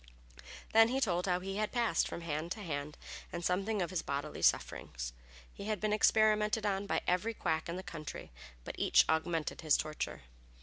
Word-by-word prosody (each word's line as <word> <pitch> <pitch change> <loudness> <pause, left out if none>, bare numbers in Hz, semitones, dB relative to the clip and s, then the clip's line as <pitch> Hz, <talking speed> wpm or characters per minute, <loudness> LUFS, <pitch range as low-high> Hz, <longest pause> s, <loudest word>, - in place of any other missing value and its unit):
Then 225 0 +8
he 260 +3 0
told 180 -7 +1
how 180 0 +1
he 195 +1 -4
had 215 0 0
passed 235 -9 +2
from - - -6
hand 165 +1 -3
to 215 - -9
hand 150 -3 -4 0.3
and 175 0 -4
something 195 +2 +1
of 170 - -4
his 185 - 0
bodily 140 +2 -4
sufferings. - - 0 0.4
He - - -8
had 215 -2 -1
been 210 +1 0
experimented 215 0 +3
on 200 0 0
by - - +1
every 195 +6 +1
quack 160 -3 -1
in 170 - -3
the 185 - -5
country, 155 - -7 0.3
but - - -6
each - - +5
augmented 160 0 0
his 155 -3 +4
torture. 155 - -4
180 Hz, 185 wpm, -33 LUFS, 160-210 Hz, 0.4 s, Then